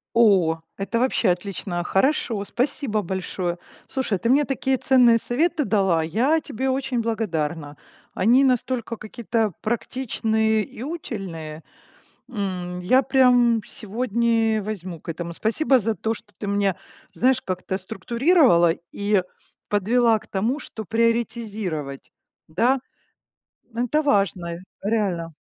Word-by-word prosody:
О, 190 Hz, -8 st, +4 dB, 0.2 s
это 200 Hz, +4 st, -2 dB
вообще 245 Hz, -5 st, +2 dB
отлично, 180 Hz, -1 st, -2 dB
хорошо, 225 Hz, -2 st, +1 dB
спасибо 250 Hz, -1 st, -1 dB
большое! 180 Hz, -1 st, -3 dB, 0.3 s
Слушай, 250 Hz, -7 st, -1 dB
ты 230 Hz, -, -1 dB
мне 285 Hz, +3 st, +5 dB
такие 265 Hz, -1 st, 0 dB
ценные 245 Hz, -3 st, +5 dB
советы 305 Hz, +7 st, 0 dB
дала, 190 Hz, -9 st, +2 dB
я 250 Hz, -, +1 dB
тебе 265 Hz, 0 st, -3 dB
очень 260 Hz, -2 st, -1 dB
благодарна. 165 Hz, -10 st, -2 dB, 0.4 s
Они 245 Hz, +7 st, +4 dB
настолько 245 Hz, -2 st, 0 dB
какие-то 220 Hz, -1 st, -2 dB
практичные 220 Hz, -2 st, 0 dB
и 230 Hz, -, -9 dB
утильные. 185 Hz, -, -6 dB, 0.7 s
М, 180 Hz, -5 st, -4 dB
я 250 Hz, +9 st, +4 dB
прям 245 Hz, -4 st, +4 dB
сегодня 225 Hz, 0 st, 0 dB
возьму 185 Hz, -5 st, -6 dB
к -, -, -18 dB
этому. 170 Hz, +1 st, -4 dB
Спасибо 255 Hz, -, +2 dB
за 225 Hz, -1 st, -1 dB
то, 220 Hz, +1 st, -2 dB
что 205 Hz, -3 st, -11 dB
ты 205 Hz, -, -5 dB
меня, 200 Hz, -2 st, +1 dB, 0.4 s
знаешь, 260 Hz, +1 st, +2 dB
как-то 185 Hz, 0 st, -3 dB
структурировала 235 Hz, -, +3 dB, 0.2 s
и 205 Hz, -2 st, +1 dB, 0.5 s
подвела 225 Hz, +3 st, +3 dB
к 215 Hz, -, -18 dB
тому, 225 Hz, +8 st, -1 dB
что 220 Hz, -6 st, -7 dB
приоритизировать. 220 Hz, -, -2 dB, 0.4 s
Да, 245 Hz, +11 st, +2 dB, 0.9 s
м, 240 Hz, +2 st, 0 dB
это 300 Hz, +5 st, +1 dB
важно. 190 Hz, -, 0 dB, 0.3 s
Реально. 190 Hz, -7 st, -1 dB
220 Hz, 120 wpm, -23 LUFS, 190-245 Hz, 0.9 s, мне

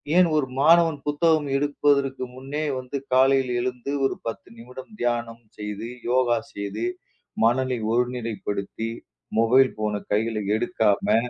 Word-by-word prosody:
ஏன் 180 Hz, -1 st, +6 dB
ஒரு 150 Hz, -3 st, +1 dB
மாணவன் 165 Hz, 0 st, +5 dB
புத்தகம் 155 Hz, 0 st, +2 dB
எடுப்பதற்கு 140 Hz, -2 st, +1 dB
முன்னே 135 Hz, +4 st, -4 dB, 0.2 s
வந்து 130 Hz, +2 st, -5 dB, 0.2 s
காலையில் 130 Hz, 0 st, +4 dB
எழுந்து 125 Hz, +2 st, -3 dB
ஒரு -, -, 0 dB
பத்து 115 Hz, 0 st, -5 dB
நிமிடம் 125 Hz, -, -11 dB
தியானம் 120 Hz, -1 st, -2 dB
செய்து, 105 Hz, +2 st, -5 dB, 0.2 s
யோகா 125 Hz, -2 st, +3 dB, 0.2 s
செய்து, 100 Hz, -, -4 dB, 0.6 s
மனனை 130 Hz, +2 st, +2 dB, 0.2 s
ஒருநிலைப்படுத்தி, 115 Hz, -3 st, -2 dB, 0.5 s
மொபைல் 130 Hz, +3 st, +5 dB
ஃபோன் 105 Hz, -1 st, -1 dB
கைல 110 Hz, +1 st, +1 dB, 0.2 s
எடுக்காம... 110 Hz, -, +1 dB
125 Hz, 115 wpm, -24 LUFS, 115-140 Hz, 0.6 s, ஏன்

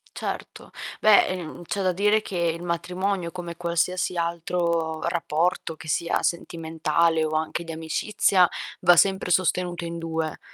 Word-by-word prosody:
Certo, -, -, -6 dB, 0.3 s
beh, 215 Hz, -1 st, +6 dB
ehm, 175 Hz, -2 st, -5 dB
c'è 195 Hz, +4 st, -3 dB
da 185 Hz, -1 st, +1 dB
dire 210 Hz, +4 st, +3 dB
che 200 Hz, -, -7 dB
il 170 Hz, -1 st, 0 dB
matrimonio 180 Hz, +1 st, -2 dB
come 175 Hz, -1 st, -6 dB
qualsiasi 175 Hz, +1 st, -1 dB
altro 170 Hz, -1 st, -1 dB
rapporto 170 Hz, 0 st, 0 dB
che 160 Hz, -, -11 dB
sia 170 Hz, +2 st, 0 dB
sentimentale 165 Hz, -1 st, 0 dB
o 155 Hz, -, -1 dB
anche 160 Hz, +2 st, -1 dB
di 165 Hz, -, -7 dB
amicizia, 175 Hz, +3 st, +2 dB, 0.3 s
va 175 Hz, -1 st, +6 dB
sempre 190 Hz, -1 st, +3 dB
sostenuto 175 Hz, 0 st, +1 dB
in 170 Hz, 0 st, -5 dB
2. 160 Hz, -1 st, -3 dB
170 Hz, 140 wpm, -25 LUFS, 165-180 Hz, 0.3 s, beh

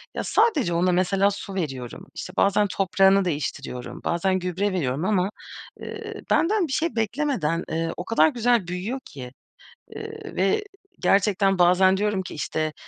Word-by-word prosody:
ya -, -, -2 dB
sadece 310 Hz, -, +2 dB
ona 180 Hz, +2 st, +2 dB
mesela 195 Hz, +3 st, +2 dB
su 200 Hz, -1 st, -7 dB
veriyorum, 135 Hz, -9 st, -5 dB
işte 180 Hz, -, -7 dB
bazen 205 Hz, +1 st, +3 dB
toprağını 195 Hz, 0 st, +3 dB
değiştiriyorum, 140 Hz, -6 st, -4 dB
bazen 185 Hz, +2 st, +1 dB
gübre 185 Hz, +3 st, -1 dB
veriyorum 145 Hz, -1 st, -1 dB
ama, 195 Hz, -2 st, +2 dB, 0.5 s
eee, -, -, -7 dB
benden 370 Hz, 0 st, +3 dB
bir -, -, -8 dB
şey 320 Hz, -7 st, 0 dB
beklemeden, 220 Hz, -, 0 dB
eee, 165 Hz, +1 st, -1 dB
o 175 Hz, -, -5 dB
kadar 230 Hz, -, +4 dB
güzel 240 Hz, -, +1 dB
büyüyor 190 Hz, +9 st, -3 dB
ki, 125 Hz, -3 st, -9 dB, 0.6 s
eee, -, -, -8 dB
ve 195 Hz, -, +1 dB, 0.4 s
gerçekten 195 Hz, -1 st, +2 dB
bazen 185 Hz, +2 st, +5 dB
diyorum 205 Hz, -1 st, 0 dB
ki, -, -, -8 dB
işte, 155 Hz, +1 st, -2 dB
190 Hz, 150 wpm, -24 LUFS, 170-210 Hz, 0.6 s, bazen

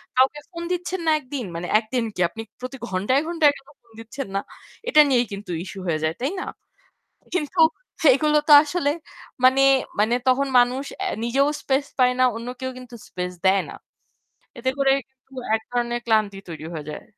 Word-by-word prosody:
কাউকে 265 Hz, +3 st, +3 dB
ফোন 340 Hz, -1 st, -7 dB
দিচ্ছেন 360 Hz, +1 st, -2 dB
না -, -, +5 dB
একদিন, 265 Hz, -3 st, -6 dB
মানে 175 Hz, +1 st, -4 dB
১ 220 Hz, -, -11 dB
দিন 240 Hz, -2 st, +1 dB
কি -, -, -10 dB
আপনি 225 Hz, -, -8 dB, 0.2 s
প্রতি 255 Hz, +1 st, -7 dB
ঘন্টায়, 205 Hz, +10 st, +1 dB
ঘন্টায় 325 Hz, -4 st, +4 dB
কেন 270 Hz, -, -19 dB
ফোন 235 Hz, -, -29 dB
দিচ্ছেন 235 Hz, +3 st, -7 dB
না? 195 Hz, -, +1 dB, 0.5 s
এটা 305 Hz, -, +7 dB
নিয়েই 245 Hz, -2 st, +3 dB
কিন্তু 195 Hz, -2 st, -7 dB
ইস্যু 195 Hz, 0 st, -8 dB
হয়ে 155 Hz, -2 st, 0 dB
যায়, 155 Hz, +1 st, 0 dB
তাই 275 Hz, +6 st, 0 dB
না? -, -, -4 dB, 0.9 s
কিন্তু 330 Hz, +1 st, -1 dB, 0.5 s
এগুলো 300 Hz, +1 st, +3 dB
তো -, -, +7 dB
আসলে 290 Hz, -2 st, 0 dB, 0.5 s
মানে 265 Hz, +1 st, +6 dB, 0.4 s
মানে 220 Hz, +3 st, +3 dB
তখন 275 Hz, +2 st, +3 dB
মানুষ 250 Hz, +3 st, +2 dB, 0.2 s
অ্যা 390 Hz, -, -1 dB, 0.2 s
নিজেও 275 Hz, +4 st, +2 dB
স্পেস 275 Hz, +1 st, +1 dB
পায় 250 Hz, 0 st, +4 dB
না, -, -, +6 dB
অন্যকেউ 250 Hz, +2 st, -5 dB
কিন্তু 250 Hz, -1 st, -12 dB
স্পেস 180 Hz, 0 st, -4 dB
দেয় 190 Hz, 0 st, +4 dB
না। -, -, -9 dB, 0.8 s
এতে 260 Hz, +2 st, -1 dB
করে 270 Hz, -1 st, +4 dB
একটু 265 Hz, +1 st, -27 dB, 0.2 s
এক 220 Hz, -, -3 dB
ধরনের 240 Hz, 0 st, -1 dB
ক্লান্তি 215 Hz, -3 st, +1 dB
তৈরি 160 Hz, -1 st, -7 dB
হয়ে 150 Hz, -2 st, -6 dB
যায়। -, -, -8 dB
255 Hz, 180 wpm, -23 LUFS, 220-280 Hz, 0.9 s, এটা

